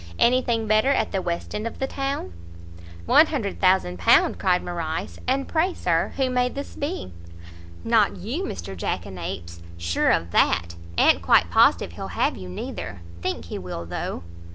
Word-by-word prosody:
any 250 +2 +4
thing 230 -3 -1
better 215 +4 +3
at 280 - +1
the 195 - -1
west 170 -1 -4
end 210 +2 -2
of - - -7
the 270 - -1
town?" 270 - -3 0.7
"£100,000!" 190 - +3
cried 180 -1 +2
Morrice, 165 -2 -4
"and 270 +1 0
pray, 345 +3 +1
Sir, 165 -2 0
who 265 -1 +2
may 250 0 +1
this 280 +2 -7
be?" 95 - -4 0.7
"Not - - +3
you, - - -4
Mr 95 +2 -5
jackanapes! 85 -1 -5 0.2
sure 85 0 +1
of 85 +1 +1
that. 85 0 +2 0.2
A'n't - - +5
quite - - +4
positive - - +4
he'll - - -6
have - - +2
you, 90 -1 -8
neither. 90 -1 -6 0.2
Think 80 -1 -3
he 85 - -6
will, 90 -2 -6
though." 85 0 -4
180 Hz, 155 wpm, -24 LUFS, -, 0.7 s, A'n't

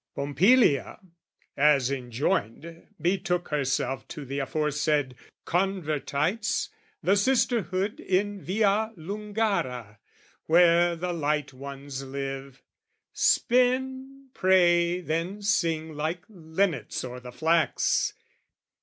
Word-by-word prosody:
Pompilia, 145 - +3 0.6
as 140 -3 +3
enjoined, 135 +4 -3
betook 175 +1 -1
herself 135 -4 -1
To 145 - -8
the 140 +2 -4
aforesaid 150 0 0 0.3
Convertites, 180 +1 -1 0.3
the 195 - +3
sisterhood 205 -3 +1
In 200 +1 -1
Via 215 +3 +1
Lungara, 195 - -3 0.5
where 170 +1 +5
the 175 +1 -3
light 150 -3 -1
ones 140 0 -7
live, 135 0 -6 0.5
Spin, 260 +2 +1
pray, 175 -1 +3
then 175 +5 -3
sing 165 -6 0
like 160 +4 -3
linnets 165 - -2
o'er 125 0 -6
the 125 0 -10
flax. 160 +4 +1
165 Hz, 90 wpm, -27 LUFS, 140-195 Hz, 0.6 s, where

